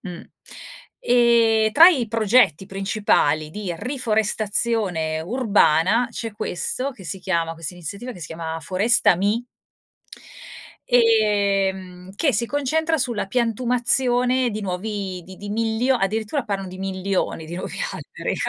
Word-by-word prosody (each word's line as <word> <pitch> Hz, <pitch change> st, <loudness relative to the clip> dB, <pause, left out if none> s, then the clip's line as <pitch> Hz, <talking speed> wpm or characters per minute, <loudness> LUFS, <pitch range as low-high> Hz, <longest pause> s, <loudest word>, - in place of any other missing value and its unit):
mh. 180 Hz, -3 st, -8 dB, 0.8 s
E 235 Hz, -2 st, +4 dB
tra 330 Hz, +8 st, +9 dB
i 260 Hz, -11 st, 0 dB
progetti 220 Hz, -, +2 dB
principali 195 Hz, -6 st, 0 dB
di 195 Hz, 0 st, -5 dB
riforestazione 215 Hz, -, -1 dB
urbana 210 Hz, 0 st, +2 dB
c'è 225 Hz, -1 st, -5 dB
questo 230 Hz, +6 st, -3 dB
che 200 Hz, -7 st, -14 dB
si 190 Hz, +3 st, -4 dB
chiama 170 Hz, -4 st, -1 dB
questa 165 Hz, +2 st, -6 dB
iniziativa 200 Hz, +8 st, -6 dB
che 180 Hz, -, -13 dB
si 155 Hz, -, -5 dB
chiama 160 Hz, 0 st, -5 dB
Forestami 200 Hz, +4 st, +2 dB, 1.4 s
ehm, 200 Hz, -5 st, +1 dB
che 280 Hz, +6 st, +1 dB
si 225 Hz, +4 st, +1 dB
concentra 315 Hz, +4 st, 0 dB
sulla 240 Hz, -6 st, -2 dB
piantumazione 245 Hz, +2 st, +2 dB
di 215 Hz, 0 st, -5 dB
nuovi 190 Hz, -1 st, -4 dB
di 185 Hz, +2 st, -12 dB
di 205 Hz, -, -8 dB
milio 225 Hz, +4 st, 0 dB
addirittura 220 Hz, +5 st, -2 dB
parlano 195 Hz, -2 st, -4 dB
di 185 Hz, -, -10 dB
milioni 190 Hz, -3 st, -3 dB
di 170 Hz, -, -7 dB
nuovi 185 Hz, -, -6 dB
alberi. -, -, -5 dB
210 Hz, 125 wpm, -22 LUFS, 185-240 Hz, 1.4 s, tra